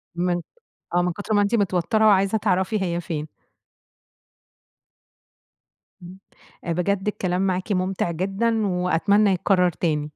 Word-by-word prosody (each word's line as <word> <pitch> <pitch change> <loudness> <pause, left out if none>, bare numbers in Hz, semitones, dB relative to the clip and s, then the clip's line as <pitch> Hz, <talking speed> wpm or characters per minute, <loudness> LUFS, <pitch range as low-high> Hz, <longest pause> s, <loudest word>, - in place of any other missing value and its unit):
من 175 0 0 0.5
آه، 175 - +3
من 180 -1 0
كُتر 205 +4 -4
ما 205 - +4
أنتِ 205 +3 0
متوترة 205 +2 +1
وعايزة 195 +1 +3
تعرفي 195 0 0
هي 175 -1 -1
فين. 155 -3 -5 2.8
إمم، 180 +2 -11 0.6
بجد 195 +3 -1
الكلام 185 -3 -1
معاكِ 185 +3 -2
ممتع، 185 -2 -1
جدًا 200 +5 -1
وأتمنى 180 +3 +2
يتكرر 180 0 +2
تاني. 155 -3 -1
185 Hz, 120 wpm, -23 LUFS, 175-205 Hz, 2.8 s, ما